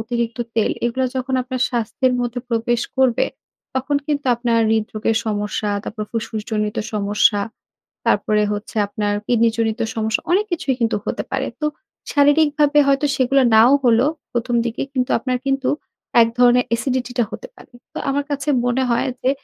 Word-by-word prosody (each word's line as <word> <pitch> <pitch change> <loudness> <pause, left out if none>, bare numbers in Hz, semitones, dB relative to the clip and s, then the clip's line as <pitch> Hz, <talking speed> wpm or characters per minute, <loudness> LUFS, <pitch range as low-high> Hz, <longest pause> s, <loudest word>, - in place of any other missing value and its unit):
অতিরিক্ত 235 +1 -3 0.2
তেল 225 - +2
এগুলা 255 +2 0
যখন 260 +1 -2
আপনার 255 0 -5
স্বাস্থ্যের 250 +2 0
মধ্যে 245 0 -2
প্রবেশ 235 +1 0 0.2
করবে, 260 -3 +3 0.5
তখন 265 +2 0
কিন্তু 290 -2 -1
আপনার 235 -1 +1
হৃদরোগের 220 0 0
সমস্যা, 210 0 -2
তারপর 215 -1 -5
ফুসফুস 220 -2 -3
জনিত 210 0 -1 0.2
সমস্যা, 205 0 +2 0.7
তারপরে 210 0 +2
হচ্ছে 205 +2 -6
আপনার 205 0 -2
কিডনি 230 -1 +3
জনিত 225 0 0
সমস্যা, 220 0 0
অনেক 395 +4 +3
কিছুই 285 -6 0
কিন্তু 225 -1 +1
হতে - - -2
পারে। 270 0 -1 0.2
তো - - +2 0.5
শারীরিকভাবে 295 0 +4
হয়তো 275 +1 +3
সেগুলো 265 +1 +3
নাও 230 +5 +7
হলো, 240 +3 +4 0.3
১ম 240 0 -1
দিকে 230 - -3
কিন্তু 255 -2 -1
আপনার 255 +1 -1
কিন্তু 270 -1 0 0.5
এক 230 - +3
ধরণের 245 0 +5
এসিডিটি 250 +1 -2
টা 235 - +4
হতে - - -7
পারে। - - -17 0.2
তো - - -5
আমার 280 +1 0
কাছে 280 0 -3 0.2
মনে 245 +2 +1
হয় 235 - +1
যে 260 - +3
240 Hz, 160 wpm, -20 LUFS, 225-265 Hz, 0.7 s, নাও